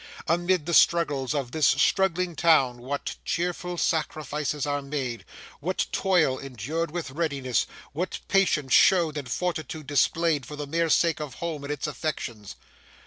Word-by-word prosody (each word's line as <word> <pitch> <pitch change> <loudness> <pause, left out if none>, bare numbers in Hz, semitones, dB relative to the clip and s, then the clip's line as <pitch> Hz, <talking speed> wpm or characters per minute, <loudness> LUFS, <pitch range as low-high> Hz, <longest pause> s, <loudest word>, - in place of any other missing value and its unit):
Amid 175 0 +1
the 170 - -2
struggles 150 -7 +3
of 135 -4 -2
this 155 -1 +3
struggling 180 +4 +2
town 140 -7 +3
what 140 +4 -4
cheerful 175 +1 -2
sacrifices 150 -2 -1
are 145 0 -1
made; 135 -4 -4 0.4
what 180 +5 -1
toil 175 -9 +2
endured 140 +6 -4
with 160 -3 -5
readiness; 140 -5 -1 0.3
what 175 +5 -3
patience 160 -9 +2
shown 170 -5 +5
and 140 -4 -5
fortitude 160 -2 -3
displayed 145 +2 +2
for 150 - -8
the 145 0 -5
mere 165 +3 0
sake 165 +1 +3
of 145 -4 -6
home 160 -4 -4
and 140 - -4
its 150 0 -3
affections! 135 -9 -4
150 Hz, 145 wpm, -26 LUFS, 140-170 Hz, 0.4 s, shown